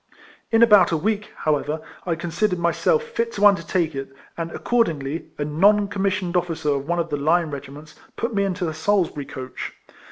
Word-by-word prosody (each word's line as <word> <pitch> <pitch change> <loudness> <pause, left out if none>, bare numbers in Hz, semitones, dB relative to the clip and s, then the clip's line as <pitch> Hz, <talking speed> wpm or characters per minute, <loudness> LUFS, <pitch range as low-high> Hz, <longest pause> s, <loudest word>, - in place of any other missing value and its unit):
In 225 0 +5
about 210 -6 +6
a 165 - +2
week, 210 +4 -1 0.2
however, 155 0 0 0.3
I 170 - +1
considered 175 +4 -1
myself 175 - +1
fit 235 - -2
to 205 0 +2
undertake 175 -4 +3
it; 135 0 -5 0.2
and, 165 -1 -4
accordingl), 165 - -1
a 145 - -2
non 200 +7 +3
commissioned 195 -3 -1
officer 170 -4 0
of 140 0 -1
one 175 +1 0
of 170 -1 -1
the 145 - 0
line 160 +2 +2
regiments 140 +2 -9 0.2
put 230 0 -3
me 200 -1 +1
into 185 -2 -1
a 160 - -3
Salisbury 160 -3 0
coach. 130 -1 -7
170 Hz, 180 wpm, -23 LUFS, 155-205 Hz, 0.3 s, about